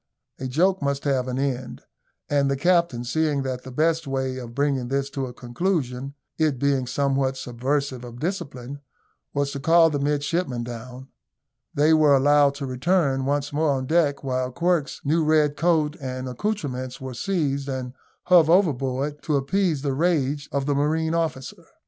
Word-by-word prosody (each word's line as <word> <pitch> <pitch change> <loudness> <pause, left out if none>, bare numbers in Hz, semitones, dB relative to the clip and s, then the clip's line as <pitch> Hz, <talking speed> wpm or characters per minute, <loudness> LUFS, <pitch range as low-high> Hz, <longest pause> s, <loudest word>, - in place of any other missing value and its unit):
A 130 - -3
joke 180 +8 +2
must 140 0 -1
have 135 -3 0
an 125 0 -3
end; 130 -2 -3 0.4
and 140 -1 +2
the 140 - 0
captain, 170 -6 +2
seeing 145 +2 0
that 130 -1 -3
the 130 - -10
best 160 +4 +1
way 130 -1 -2
of 120 -2 -9
bringing 140 -3 0
this 140 +1 -1
to 135 -2 -3
a - - -7
conclusion 135 0 -2 0.2
(it 155 -4 +2
being 135 -1 +1
somewhat 135 0 0
subversive 130 +1 -2
of 120 0 -9
discipline) 140 -6 -5 0.5
was 140 0 0
to 140 - -5
call 165 +3 +5
the 145 - -1
midshipmen 145 -2 -1
down, 125 +3 -8 0.7
they 150 +3 +4
were 150 -3 +5
allowed 145 +1 +4
to 140 -1 -5
return 135 0 +1
once 145 +1 -1
more 155 +1 +1
on 130 -1 -2
deck, 150 -2 +1
while 130 -1 -1
Quirk's 170 0 0
new 160 +3 +2
red 150 -1 +3
coat 160 -2 +1
and 130 -1 -4
accoutrements 130 - -3
were 130 -1 -6
seized 140 -3 -1
and 130 -2 -4 0.3
hove 175 -3 +5
overboard, 145 -5 +1
to 150 - 0
appease 155 +1 0
the 140 -2 0
rage 145 -2 0
of 140 -1 -1
the 145 - +1
marine 160 +3 0
officer. 160 -6 -3
140 Hz, 165 wpm, -24 LUFS, 130-155 Hz, 0.7 s, call